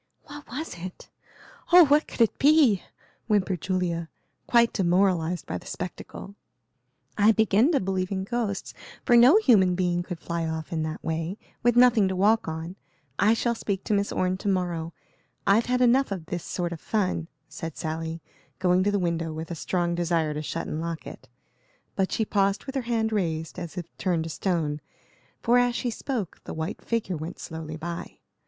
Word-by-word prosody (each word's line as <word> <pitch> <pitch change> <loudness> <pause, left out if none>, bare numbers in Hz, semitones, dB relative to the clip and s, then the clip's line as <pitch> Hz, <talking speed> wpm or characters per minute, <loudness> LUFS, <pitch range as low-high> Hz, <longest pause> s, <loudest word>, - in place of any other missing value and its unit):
"What 290 0 -11
was 265 - -6
it? 180 +1 -9 0.6
Oh, 355 -1 +9
what 295 +2 +3
could - - -5
it 225 - +3
be?" 280 - +5 0.5
whimpered 195 -5 +1
Julia, 170 -3 -1 0.4
quite 235 -1 +4
demoralized 180 -2 +1
by - - -4
the - - -15
spectacle. 185 +2 -7 0.9
"I 210 +2 +7
begin 220 - +3
to 280 - +4
believe 185 0 -2
in 190 -1 -1
ghosts, 205 -2 -3 0.3
for 240 - +5
no 250 - +8
human 200 - +4
being 175 -1 0
could 175 0 -6
fly 170 -1 -3
off 160 0 -4
in 160 - -1
that 155 0 -4
way, 165 +4 -2 0.2
with 240 0 +3
nothing 240 -5 +6
to 190 - -2
walk 210 +4 +3
on. 160 +3 -5 0.4
I 210 +4 +5
shall 235 +1 0
speak 200 -4 -3
to - - -1
Miss 200 0 +1
Orne 185 0 0
to 200 - -6
morrow; 175 -4 -1 0.5
I've 205 +4 +4
had 250 0 +1
enough 250 0 +4
of 185 -5 -4
this 175 0 -4
sort 175 -1 -3
of 165 - -9
fun," 185 -6 -1 0.2
said 165 -2 -7
Sally, 160 0 -4 0.3
going 180 0 +3
to 205 - +2
the 205 - +1
window, 170 -3 -1
with 160 +2 -6
a - - -3
strong 175 +1 -1
desire 170 -3 0
to 150 - -3
shut 165 +2 -4
and 155 - -4
lock 165 -1 -4
it. - - -11 0.7
But 190 -1 0
she 220 - 0
paused 195 -1 +1
with 270 - -6
her 270 - -1
hand 220 -2 +1
raised, 160 -4 -2
as 170 -2 -7
if 175 - -3
turned 175 -4 0
to 165 - -5
stone, 155 -5 -1 0.6
for 245 +1 +5
as 245 -1 +2
she 245 - -1
spoke 230 - -4
the - - -6
white 160 +5 -4
figure 225 -6 -2
went 160 +4 -6
slowly 160 -1 -7
by. 170 +2 -6
185 Hz, 190 wpm, -26 LUFS, 165-220 Hz, 0.9 s, Oh